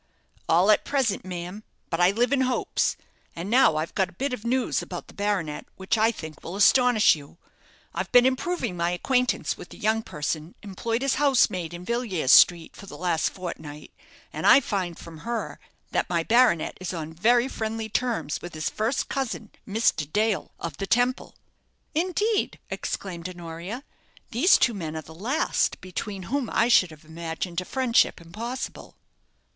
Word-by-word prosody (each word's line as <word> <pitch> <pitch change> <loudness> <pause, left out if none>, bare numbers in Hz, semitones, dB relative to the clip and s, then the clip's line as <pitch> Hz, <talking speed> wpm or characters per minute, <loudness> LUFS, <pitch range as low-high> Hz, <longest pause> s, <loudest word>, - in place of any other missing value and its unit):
"All 180 +6 +5
at 210 - +3
present, 260 -10 0
ma'am; 180 +3 -6 0.3
but 165 - -1
I 175 0 +6
live 240 +6 +1
in 270 - +3
hopes. 255 -1 0 0.4
And 175 +5 -5
now 245 -10 +5
I've 155 +2 -2
got 190 -3 +1
a - - -18
bit 265 +8 -2
of 245 - -5
news 250 +2 0
about - - -7
the - - -14
baronet, 200 -7 -2
which 190 +3 -1
I 220 +1 +3
think 160 -8 -9
will 175 - -6
astonish 245 0 +5
you. 145 +2 -13 0.6
I've - - -3
been 245 0 +7
improving 260 - 0
my 170 0 0
acquaintance 250 +8 0
with - - -10
the - - -12
young 220 +1 +1
person 155 -2 -4
employed 225 +5 -3
as 275 - +1
housemaid 190 - +3
in 175 +1 -8
Villiers 220 - 0
Street 170 -2 +6
for 200 - -12
the - - -9
last 175 -3 +1
fortnight, 155 -5 -8 0.4
and - - -1
I - - +9
find 190 -9 -3
from 165 -2 -11
her 235 +4 -4 0.3
that - - 0
my 170 -2 +1
baronet 230 -5 +3
is 185 0 -4
on 160 -1 -5
very 235 +8 +3
friendly 220 -3 -3
terms 230 - -1
with 175 -2 -8
his 155 - -2
first 225 +5 -1
cousin, 250 -5 -3 0.2
Mr. 195 -8 +1
Dale, 215 0 +1
of 165 -4 -5
the 195 - -4
Temple." 245 +4 +1 0.6
"Indeed!" 375 +6 0
exclaimed 180 -2 -4
Honoria. 175 +7 -7 0.5
"These 265 - +5
two 240 - +2
men 160 -6 -5
are 160 - -5
the 160 - -13
last 235 - 0
between 190 +1 -5
whom 260 +5 -2
I 230 - +2
should 200 -6 +5
have 155 -1 -15
imagined 165 +2 -4
a - - -8
friendship 255 0 +2
impossible." 225 +10 -6
200 Hz, 175 wpm, -26 LUFS, 170-245 Hz, 0.6 s, I